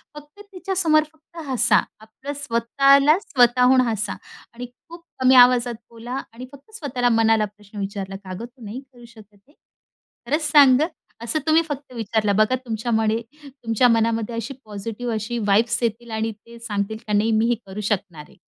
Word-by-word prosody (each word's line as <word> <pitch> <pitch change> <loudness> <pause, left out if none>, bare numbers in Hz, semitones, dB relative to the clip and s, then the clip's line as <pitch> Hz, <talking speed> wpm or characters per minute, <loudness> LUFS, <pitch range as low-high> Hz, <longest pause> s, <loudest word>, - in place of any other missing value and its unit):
फक्त 295 +5 -14
तिच्या 385 0 -5
समोर 315 -4 +3
फक्त 315 +2 -23
हसा. 255 -3 +3 0.2
आपलं 220 +6 -9
स्वतःला 275 +5 +3
स्वतःहून 255 - +3
हसा 215 -3 -2 0.4
आणि 245 +1 -7 0.2
खूप 340 0 -12 0.2
कमी 260 0 +6
आवाजात 245 -1 +5
बोला 240 +3 -6
आणि 245 +2 -9
फक्त 280 +8 -17
स्वतःला 250 - -1
मनाला 225 -1 +3
प्रश्न 210 0 -15
विचारला," 195 -1 -5
का 195 -1 -9
गं 230 - -6
तू 245 +1 -19
नाही 215 +5 -6
करू 250 -3 -18
शकत 215 -3 -18
हे? 295 - -25 0.7
खरंच 300 +4 -1
सांग 275 -4 +7
ग." 315 - +2 0.4
असं 275 +7 -2
तुम्ही 315 +1 +4
फक्त 285 -3 -7
विचारलं. 220 -3 -1
बघा 215 +5 +3
तुमच्यामध्ये, 225 -2 -1 0.3
तुमच्या 245 -3 0
मनामध्ये 230 0 0
अशी 230 +4 -5
पॉझिटिव्ह 220 +3 -5
अशी 215 +2 -4
येतील 230 -3 -2
व्हाइब्स 230 +4 +2 0.3
आणि 220 +1 -2
ते 235 0 -14
सांगतील 210 -2 -3
का 210 - -2
नाही 210 +2 +2
मी 220 +1 +2
हे 240 - +2
करू 195 +2 -7
शकणार 195 -6 -3
आहे. - - -22
235 Hz, 170 wpm, -22 LUFS, 220-265 Hz, 0.7 s, सांग